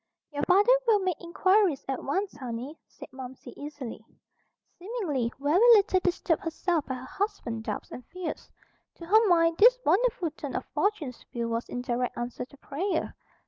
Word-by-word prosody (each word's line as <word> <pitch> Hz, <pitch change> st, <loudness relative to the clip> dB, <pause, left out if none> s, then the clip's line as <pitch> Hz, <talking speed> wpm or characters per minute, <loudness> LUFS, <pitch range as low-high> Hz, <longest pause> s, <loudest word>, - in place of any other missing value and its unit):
"Your 290 Hz, -, -2 dB
father 400 Hz, +6 st, +5 dB, 0.2 s
will 445 Hz, -2 st, +6 dB
make 370 Hz, -5 st, -2 dB
inquiries 370 Hz, -2 st, +2 dB
at 270 Hz, -2 st, -3 dB
once, 380 Hz, +8 st, -2 dB
honey," 255 Hz, +2 st, -6 dB
said -, -, -12 dB
Momsey 260 Hz, -1 st, -9 dB
easily, 285 Hz, -7 st, -7 dB, 0.8 s
seemingly 345 Hz, -, -2 dB
very 290 Hz, +6 st, +2 dB, 0.2 s
little 395 Hz, -3 st, +4 dB
disturbed 355 Hz, -2 st, 0 dB
herself 330 Hz, -1 st, -1 dB
by 260 Hz, -, -2 dB
her 255 Hz, 0 st, -8 dB
husband's 260 Hz, -, -4 dB
doubts -, -, -4 dB
and 250 Hz, -, -8 dB
fears. 360 Hz, -3 st, -6 dB, 0.5 s
To 335 Hz, -, -10 dB
her 435 Hz, +5 st, +5 dB
mind 330 Hz, -2 st, +3 dB
this -, -, +7 dB
wonderful 395 Hz, -7 st, +2 dB
turn 305 Hz, -, -7 dB
of -, -, -2 dB
fortune's 325 Hz, -, -1 dB
wheel 235 Hz, -1 st, -1 dB
was 230 Hz, +1 st, -3 dB
in 245 Hz, -, -4 dB
direct 245 Hz, 0 st, -2 dB
answer 240 Hz, +1 st, -4 dB
to 280 Hz, -, -19 dB
prayer. 325 Hz, +8 st, -2 dB
325 Hz, 165 wpm, -28 LUFS, 260-385 Hz, 0.8 s, this